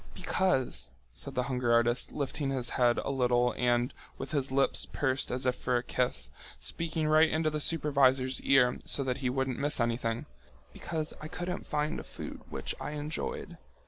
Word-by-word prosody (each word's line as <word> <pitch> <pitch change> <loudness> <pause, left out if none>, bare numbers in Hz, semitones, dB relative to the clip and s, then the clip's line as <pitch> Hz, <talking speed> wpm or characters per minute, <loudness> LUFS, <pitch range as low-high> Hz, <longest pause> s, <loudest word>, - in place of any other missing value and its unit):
"Because," 130 - 0 0.2
said 140 - -8
the 125 - +1
hunger 125 -2 0
artist, 120 +1 +2
lifting 140 0 -2
his 130 -3 -1
head 120 -1 +3
a - - -2
little 125 -2 +2
and, 120 0 +1 0.2
with - - -6
his 140 -4 -1
lips 135 +1 +2
pursed 135 -2 0
as 125 +1 -1
if 125 0 +2
for 125 -1 0
a 120 - -2
kiss, 125 - -1 0.3
speaking 160 -2 0
right 155 +1 +5
into 160 0 +1
the 150 - -2
supervisor's 135 -4 +3
ear 125 -2 +4
so 140 - +1
that 130 -1 -1
he 130 -2 -1
wouldn't 130 -1 -1
miss 145 0 +1
anything, 115 -1 -1 0.5
"because 155 -2 -3
I 155 - -5
couldn't 175 +3 -5
find 150 0 -1
a - - -7
food - - -8
which - - -3
I 150 - -4
enjoyed. 160 - -4
135 Hz, 175 wpm, -30 LUFS, 125-150 Hz, 0.5 s, right